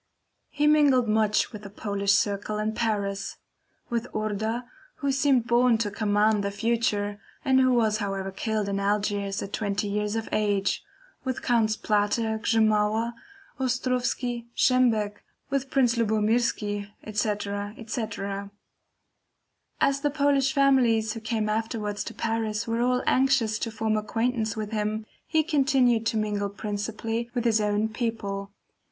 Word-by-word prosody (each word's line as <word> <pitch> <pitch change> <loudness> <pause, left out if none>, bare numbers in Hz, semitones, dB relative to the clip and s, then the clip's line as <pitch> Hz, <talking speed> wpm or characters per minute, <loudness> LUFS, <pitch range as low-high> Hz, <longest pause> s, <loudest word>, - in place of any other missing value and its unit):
He 295 0 0
mingled 290 -5 +5
much 215 +1 +2
with 210 - -7
the 200 - -9
Polish 200 -1 0
circle 205 +1 0
in 215 +1 -1
Paris; 200 -3 -2 0.5
with 235 +1 -1
Orda 215 +3 -2 0.3
who 280 -1 -1
seemed 265 -3 +3
born 240 -1 +4
to 215 -2 -1
command 210 0 +2
the 200 - 0
future, 205 -1 -1 0.2
and 265 -1 +4
who 255 0 +4
was 220 -3 +2
however 195 -2 -3
killed 215 +1 -2
in 200 0 -1
Algiers 200 0 0
at 195 - -8
twenty 205 -1 -1
years 210 +1 -1
of 225 -1 -2
age; 205 -2 +1 0.4
with 260 -1 -3
Counts 225 -3 +2
Plater, 220 +1 0
Grzymala, 220 +1 +2 0.5
Ostrowski, 250 -1 -1
Szembeck, 225 -5 +3 0.3
with 275 -1 -1
Prince 250 -3 +3
Lubomirski, 215 -2 +1
etc. 205 -1 -2
etc. 205 -3 -4 1.3
As 275 0 +2
the 290 - +2
Polish 280 -2 +2
families 245 -6 +3
who 225 - -6
came 220 -1 -1
afterwards 215 -1 -2
to - - -7
Paris 225 -1 -1
were 230 +1 0
all 250 +1 +2
anxious 255 -5 +2
to 230 - -2
form 220 0 -1
acquaintance 225 +1 -1
with 215 0 -4
him, 215 0 -2 0.2
he 315 -1 +2
continued 265 -7 +2
to 220 +1 0
mingle 205 -1 -1
principally 215 +3 -3
with 240 - 0
his 220 -2 +3
own 210 +1 +1
people. 215 -4 -3
220 Hz, 140 wpm, -26 LUFS, 205-240 Hz, 1.3 s, mingled